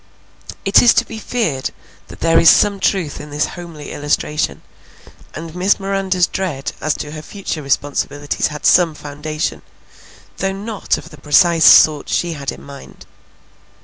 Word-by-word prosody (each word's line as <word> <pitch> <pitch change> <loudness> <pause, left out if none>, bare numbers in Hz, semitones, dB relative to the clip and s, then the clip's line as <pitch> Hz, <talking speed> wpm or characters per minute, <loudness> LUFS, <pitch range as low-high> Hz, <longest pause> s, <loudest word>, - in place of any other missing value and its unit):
It 195 - +6
is 240 - +5
to - - +3
be 220 - -8
feared 170 - -2 0.4
that - - -13
there 165 0 +4
is 165 - +7
some 200 -1 +4
truth 185 -6 -1
in 150 - -10
this 150 +1 0
homely 170 -4 -9
illustration, 150 +1 -2 0.7
and 160 +2 -7
Miss 185 +4 +1
Miranda's 195 -2 0
dread 165 -9 -4
as 155 - 0
to 150 - -6
her 155 0 -7
future 180 -1 -6
responsibilities 145 +1 -1
had 150 -1 -7
some 170 -4 +4
foundation, 150 +2 -5 0.8
though 195 0 -1
not 205 +1 -2
of 165 - -11
the 150 -3 -15
precise 165 +2 +4
sort 150 -2 +6
she 175 -1 -1
had 140 -3 -4
in - - -11
mind. 140 -1 -13
160 Hz, 155 wpm, -18 LUFS, 150-190 Hz, 0.8 s, is